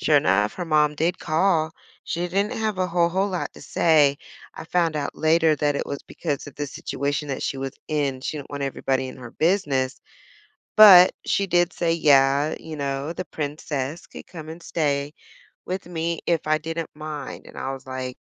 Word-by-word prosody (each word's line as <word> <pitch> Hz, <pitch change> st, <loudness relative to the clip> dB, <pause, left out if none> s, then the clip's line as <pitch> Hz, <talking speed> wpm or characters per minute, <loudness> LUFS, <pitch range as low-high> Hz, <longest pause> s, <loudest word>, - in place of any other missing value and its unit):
sure -, -, +4 dB
enough, 100 Hz, +4 st, +2 dB
her 180 Hz, -, -4 dB
mom 150 Hz, -2 st, +2 dB
did 165 Hz, +4 st, 0 dB
call. 160 Hz, -1 st, +1 dB, 0.3 s
She 175 Hz, +1 st, -2 dB
didn't 200 Hz, +5 st, 0 dB
have 220 Hz, -4 st, -2 dB
a 185 Hz, -, +1 dB
whole 170 Hz, -1 st, +2 dB
whole 190 Hz, +3 st, +1 dB
lot 180 Hz, -2 st, -3 dB
to -, -, -14 dB
say. 150 Hz, -4 st, +3 dB, 0.4 s
I -, -, -8 dB
found 165 Hz, -1 st, +1 dB
out 140 Hz, -1 st, -3 dB
later 160 Hz, 0 st, +4 dB
that 145 Hz, 0 st, +1 dB
it -, -, -2 dB
was 140 Hz, -, -4 dB
because 145 Hz, -5 st, -4 dB
of 145 Hz, -, -10 dB
the 145 Hz, -, -3 dB
situation 145 Hz, +2 st, -3 dB
that 135 Hz, -, -3 dB
she 135 Hz, -, -2 dB
was 135 Hz, 0 st, -4 dB, 0.2 s
in, 145 Hz, -4 st, -1 dB
she 150 Hz, -, -3 dB
didn't 140 Hz, -, -9 dB
want 140 Hz, -1 st, -4 dB
everybody 130 Hz, -1 st, -1 dB
in -, -, -9 dB
her 120 Hz, -2 st, -10 dB
business. 145 Hz, -7 st, 0 dB, 0.8 s
But 190 Hz, -4 st, +10 dB
she 200 Hz, -, +1 dB
did 175 Hz, 0 st, +2 dB
say, 170 Hz, -1 st, 0 dB
"Yeah," 140 Hz, -2 st, +4 dB
you 160 Hz, -1 st, -8 dB
know, 140 Hz, +2 st, -3 dB
the 185 Hz, -, -4 dB
princess 145 Hz, 0 st, -4 dB
could -, -, -11 dB
come 160 Hz, -3 st, -10 dB
and 165 Hz, +1 st, -9 dB
stay 145 Hz, -3 st, -1 dB, 0.5 s
with 185 Hz, +2 st, -4 dB
me 170 Hz, -1 st, -2 dB
if 170 Hz, -2 st, 0 dB
I 155 Hz, 0 st, +3 dB
didn't 165 Hz, +1 st, -5 dB
mind. 155 Hz, -1 st, -7 dB
And -, -, -13 dB
I 135 Hz, -, -3 dB
was 135 Hz, -, -9 dB
like, 130 Hz, -1 st, -5 dB
155 Hz, 195 wpm, -24 LUFS, 140-170 Hz, 0.8 s, But